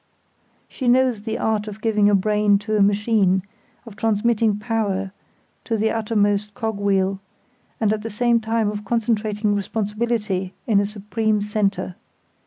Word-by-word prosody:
She 255 - -5
knows 250 -3 +3
the 220 +1 -3
art 215 -1 -1
of 210 0 -7
giving 215 -2 +2
a 205 - +4
brain 210 +1 +3
to 215 -1 0
a 210 - +3
machine, 200 -2 +2 0.4
of 225 -4 -11
transmitting 220 0 +1
power 210 -3 -2 0.5
to 225 - -1
the 220 +1 +1
uttermost 210 -2 0
cog 220 -2 -3
wheel, 195 -1 +1 0.6
and 215 -2 +2
at 215 - -3
the 225 - -5
same 235 +2 +2
time 225 -1 0
of 210 0 -6
concentrating 215 -1 0
responsibility 210 -2 -2
in 210 -4 +3
a 200 - +1
supreme 210 +1 -1
centre. 205 -2 -1
210 Hz, 150 wpm, -22 LUFS, 205-225 Hz, 0.6 s, a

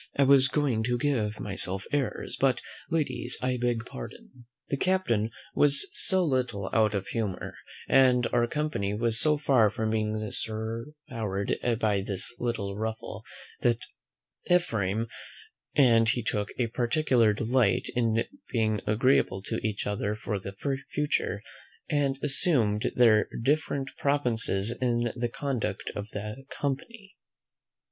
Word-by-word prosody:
I 140 - +5
was 135 -1 +6
going 135 -5 +1
to 120 0 +1
give 115 -6 0
myself 95 -1 -1
airs, 145 -3 -1
but, 130 -2 +3 0.3
ladies, 155 -6 0
I 125 0 0
beg 120 -2 0
pardon." 120 - -10 0.2
The 140 - 0
captain 135 - +1 0.2
was 140 -1 +3
so 190 -1 +1
little 125 - -1
out 110 -2 +3
of 95 -1 -3
humour, 105 -5 -3 0.3
and 125 -2 +5
our 120 0 +3
company 120 -9 -1
was 115 +1 +1
so 150 -1 +3
far 130 -7 +4
from 110 +1 -2
being 110 -1 0
soured 115 +6 -4 0.8
by 105 -4 +2
this 100 +2 -2
little 110 -5 -2
ruffle, 110 +1 -4 0.4
that 120 -1 +3 0.7
Ephraim 115 - +1 0.7
and 115 -5 +5
he 120 0 +1
took 105 -1 -1
a 125 - +2
particular 120 0 +2
delight 115 -1 +2
in 115 -2 +2 0.3
being 110 -3 +1
agreeable 105 -4 +2
to - - -2
each 105 -1 -2
other 105 +1 -1
for 105 -1 -3
the 100 +1 -7 0.4
future; 150 0 0 0.5
and 140 -2 +1
assumed 130 -8 +2
their 115 -3 +5
different 140 -1 0
provinces 120 -6 0
in 120 -2 +1
the 120 -1 -1
conduct 135 -2 -3
of 100 +1 -5
the 105 +5 -6
company. 195 - -5
120 Hz, 130 wpm, -28 LUFS, 105-135 Hz, 0.8 s, was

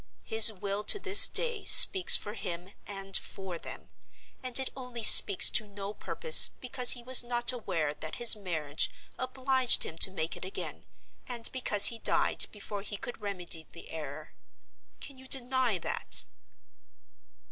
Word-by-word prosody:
His 220 0 +2
will 200 0 -8
to - - +2
this 400 0 +6
day 475 -4 -4
speaks 375 -2 +7
for 210 - -10
him 180 -2 -10
and 195 -1 -5
for 190 -3 -4
them; - - -13 0.5
and 255 -2 -3
it 265 -1 -1
only 250 -3 -9
speaks 200 -2 +7
to 215 - -5
no 200 0 -11
purpose, 480 - +4
because 250 0 0
he 245 - -12
was 255 +1 +3
not 240 +1 -4
aware 165 -11 -7
that 155 +1 -11
his 240 -1 +2
marriage 160 -7 -6 0.3
obliged 255 -1 -1
him 165 - -12
to - - +1
make 165 -3 -7
it - - -13
again, 185 - -11 0.4
and 235 -2 -4
because 215 -6 -1
he 230 - -13
died - - -1
before 205 -1 -11
he 205 0 -10
could 240 +2 -12
remedy 180 -5 -6
the 170 - -16
error. 155 -1 -12 0.7
Can 275 -3 -13
you 265 - -17
deny 260 -4 -1
that?" 170 - -5
215 Hz, 160 wpm, -25 LUFS, 190-255 Hz, 0.7 s, speaks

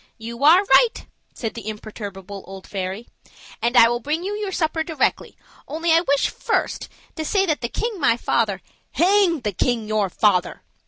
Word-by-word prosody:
"You 235 +3 -7
are 335 +6 +7
right," 455 +3 +3 0.3
said 225 -3 -5
the 225 -3 -9
imperturbable 205 -2 -8
old 190 0 -10
fairy; 195 +3 -5 0.5
"and 240 +2 +1
I 230 - +9
will 240 +1 -1
bring 305 +7 -2
you 400 +2 -3
your 415 -2 -3
supper 320 -2 -1
directly, 320 -2 -1 0.3
only 325 +3 -1
I 330 +1 +5
wish 280 -4 +1
first 460 - -2
just - - -29
to 315 - -2
say 390 +4 +2
that 310 -8 -1
the 235 - -2
king 450 - -3
my 235 -6 +3
father 210 -5 0 0.2
" - - -43
"Hang 355 -1 +3
the 210 -3 -2
king 230 +2 -1
your 215 -2 0
father!" 185 -1 +1
240 Hz, 190 wpm, -22 LUFS, 215-335 Hz, 0.5 s, I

